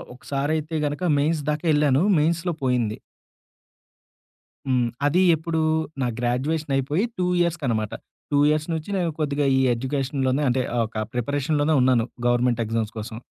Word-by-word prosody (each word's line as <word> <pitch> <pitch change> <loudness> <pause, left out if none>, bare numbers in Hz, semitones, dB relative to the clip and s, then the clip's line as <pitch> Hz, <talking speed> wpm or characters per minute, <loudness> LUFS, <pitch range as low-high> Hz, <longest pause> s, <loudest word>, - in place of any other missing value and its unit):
ఒకసారైతే 150 +4 -2
గనక 155 +4 -1
మెయిన్స్ 155 +2 +1
దాకెళ్ళాను. 150 -1 +2 0.2
మెయిన్స్‌లో 170 +3 0
పోయింది. 120 -4 0 1.7
హ్మ్. 125 -2 +2 0.2
అది 170 +6 +3
ఎప్పుడు? 160 0 -2 0.4
నా 125 - +1
గ్రాడ్యుయేషన్ 135 +5 -1
అయిపోయి 145 - 0
2 180 - 0 0.2
ఇయర్స్‌కనమాట. 130 -11 -1 0.4
2 145 - +3
ఇయర్స్ 155 +1 0
నుంచి 160 +3 -4
నేను 175 -2 0
కొద్దిగా 145 -1 0
ఈ - - +3
ఎడ్యుకేషన్‌లోనే 135 +2 -1
అంటే 130 +1 +1 0.2
ఒక 110 -1 -4
ప్రిపరేషన్‌లోనే 145 +4 0
ఉన్నాను, 125 -3 +3 0.2
గవర్నమెంట్ 120 -1 +2
ఎగ్జామ్స్ 110 -1 -2
కోసం. 110 +1 -6
140 Hz, 125 wpm, -24 LUFS, 125-155 Hz, 1.7 s, అది